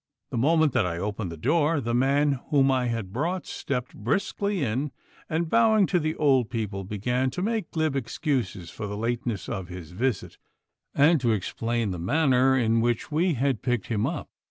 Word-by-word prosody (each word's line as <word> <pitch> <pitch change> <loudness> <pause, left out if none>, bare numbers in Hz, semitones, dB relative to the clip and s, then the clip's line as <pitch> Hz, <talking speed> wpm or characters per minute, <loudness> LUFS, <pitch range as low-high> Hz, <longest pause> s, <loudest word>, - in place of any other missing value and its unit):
The - - -2
moment 155 +1 +3
that - - +3
I 85 -1 -3
opened 100 0 -3
the 85 - -7
door 150 - +2
the 120 -3 -2
man 140 +2 +2
whom 135 -3 +4
I 130 -2 +1
had 115 -5 -3
brought 170 +9 -1
stepped 125 -2 -4
briskly 195 - -1
in, 130 +5 -1 0.4
and 165 +1 0
bowing 220 +1 +4
to 180 -1 +1
the 155 0 -1
old 135 -6 +3
people 105 -4 -3
began 125 +7 -1
to 180 +8 -4
make 220 -4 -1
glib 155 -3 0
excuses 115 - -2
for 105 +3 -5
the 100 0 -5
lateness 115 -1 -2
of 95 -6 -4
his 90 -3 -9
visit, 115 +4 -2 0.6
and 150 +1 +5
to 120 -3 +2
explain 115 +2 -2
the 90 - -4
manner 130 - +3
in 115 -2 +2
which 120 +3 -1
we 165 +2 +2
had 130 -2 0
picked 125 -5 -1
him 110 -3 0
up. - - -4
125 Hz, 185 wpm, -26 LUFS, 110-150 Hz, 0.6 s, and